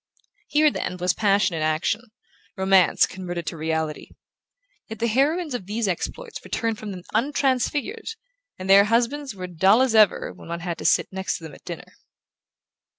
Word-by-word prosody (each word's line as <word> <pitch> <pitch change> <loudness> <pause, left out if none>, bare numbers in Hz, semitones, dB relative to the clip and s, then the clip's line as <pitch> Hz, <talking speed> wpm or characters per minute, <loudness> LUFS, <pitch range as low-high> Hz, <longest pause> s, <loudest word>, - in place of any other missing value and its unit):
Here, 300 0 +4
then, 180 - -4
was 180 0 +1
passion 200 -3 +2
in 160 - -3
action, 155 +7 0 0.6
romance 190 -1 +4
converted 175 -2 -6
to - - -4
reality; 160 -1 -3 0.8
yet 220 - -7
the 230 - -1
heroines 285 +7 +1
of 200 -7 -5
these 215 +1 -1
exploits 455 - -4
returned 225 -2 -2
from 215 - -6
them 185 -3 -7
untransfigured, 285 - 0 0.4
and 185 - -7
their 200 +1 +7
husbands 240 +3 0
were 185 - -8
as 180 -2 -11
dull 195 +8 +5
as 260 -3 +1
ever 215 -3 +4
when - - -14
one 170 0 -4
had 170 -1 -4
to - - -7
sit - - +3
next 190 0 -2
to - - -15
them 160 -3 -9
at - - -15
dinner. - - -8
200 Hz, 175 wpm, -24 LUFS, 180-250 Hz, 0.8 s, their